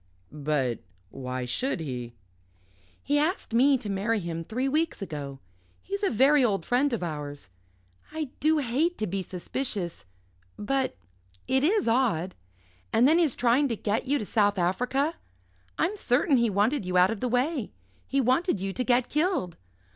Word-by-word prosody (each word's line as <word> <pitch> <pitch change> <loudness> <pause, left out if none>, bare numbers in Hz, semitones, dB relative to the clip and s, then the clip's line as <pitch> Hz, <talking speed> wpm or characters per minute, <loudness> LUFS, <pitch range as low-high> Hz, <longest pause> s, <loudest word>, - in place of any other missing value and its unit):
"But 145 -5 -1 0.3
why 130 -1 -4
should 245 - -2
he?" 125 -6 -5 0.9
"He 290 +1 +2
asked 310 - -1
me 265 +4 +5
to 240 -4 -8
marry 205 +3 0
him 165 -2 -4
three 250 +9 -2
weeks 315 +4 0
ago. 145 -7 -6 0.4
He's 400 +1 -4
a 400 - +2
very 270 +4 +4
old 200 -7 +1
friend 265 +4 +2
of 230 -6 -2
ours. 145 - -6 0.6
I 310 -4 -4
do 310 +1 +3
hate 295 +6 0
to 215 - -1
be 195 0 -2
suspicious 185 - -4 0.5
but 265 +5 -1 0.5
it 265 +1 +2
is 395 - +2
odd. 225 -8 +1 0.6
And 245 - +5
then 320 +4 +5
his 315 -7 +2
trying 250 +4 +3
to 235 - -1
get 215 +4 -2
you 285 +2 +2
to 215 - -4
South 205 -1 +2
Africa. 250 - 0 0.6
I'm 355 +6 +1
certain 280 -5 +2
he 235 -1 +2
wanted 210 +7 +1
you 180 0 -1
out 180 +3 +5
of 225 - -4
the 250 - -1
way. 255 +1 0 0.4
He 275 - 0
wanted 260 - +2
you 195 +1 -3
to 255 - -1
get 245 -1 +2
killed. 300 - 0
235 Hz, 165 wpm, -27 LUFS, 185-280 Hz, 0.9 s, me